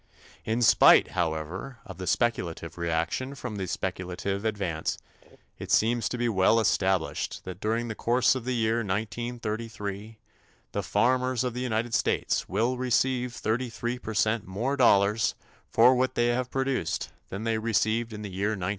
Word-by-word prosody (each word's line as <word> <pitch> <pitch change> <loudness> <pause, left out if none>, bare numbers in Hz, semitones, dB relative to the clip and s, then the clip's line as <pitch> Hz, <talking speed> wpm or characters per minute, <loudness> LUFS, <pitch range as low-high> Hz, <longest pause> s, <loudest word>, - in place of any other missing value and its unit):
In 115 +2 0
spite, - - +7
however, 85 - -3
of 95 -4 -10
the 95 - -5
speculative 90 -9 -1
reaction 85 +11 -2
from 125 -5 -6
the 95 -2 -3
speculative 95 +3 -3
advance, 100 -7 -2 0.6
it - - -7
seems 115 +1 +2
to 125 - -3
be 120 0 0
well 105 +1 +3
established 95 -5 0
that 95 -1 -8
during 115 +3 -1
the 110 - -3
course 120 +2 +2
of 130 -3 -4
the 125 +1 -2
year 115 0 +1
1933 110 -1 -4 0.5
the - - -2
farmers 125 +3 +1
of 125 -2 -2
the 125 - -4
United 120 -1 -1
States 100 - 0
will 125 +3 0
receive 125 0 +1
33 120 +1 -2
percent 110 -1 0
more 115 +9 -1
dollars 105 -4 +3 0.3
for 120 +3 +6
what 130 +1 0
they 120 0 +2
have 125 +1 -1
produced 135 -10 -1 0.2
than 100 +3 -5
they 115 -1 0
received 115 +1 0
in 105 0 -7
the 100 - -6
year 100 +4 -1
1932. 90 0 -3
110 Hz, 155 wpm, -27 LUFS, 100-120 Hz, 0.6 s, spite